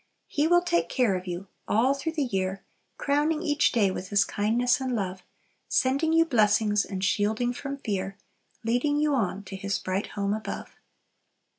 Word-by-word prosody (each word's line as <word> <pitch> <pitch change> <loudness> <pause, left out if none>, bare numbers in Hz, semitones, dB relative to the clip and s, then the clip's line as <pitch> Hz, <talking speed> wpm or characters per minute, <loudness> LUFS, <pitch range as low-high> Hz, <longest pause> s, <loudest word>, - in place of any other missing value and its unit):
"He 295 +2 0
will 350 +1 +4
take 345 -1 +1
care 245 -7 +2
of 185 0 -5
you! 175 +2 -4 0.2
All 245 +6 +3
through 280 +4 -3
the 305 -3 0
year 190 -5 -2 0.3
Crowning 300 +3 +1
each 295 -2 +2
day 205 -6 +3
with 185 0 -5
His 200 -1 +3
kindness 240 +5 +1
and 260 -2 -1
love, 190 -3 -3 0.5
Sending 280 +5 +2
you 330 0 +5
blessings 210 -5 +3
and 190 -1 -5
shielding 215 +5 +1
from 275 +2 -5
fear, 195 -6 -3 0.5
Leading 245 +6 +1
you 300 -1 +2
on 205 -5 -1
to 195 - -8
His 200 +1 -2
bright 185 +2 -2
home 200 0 0
above." 215 0 -5
220 Hz, 170 wpm, -27 LUFS, 195-280 Hz, 0.5 s, you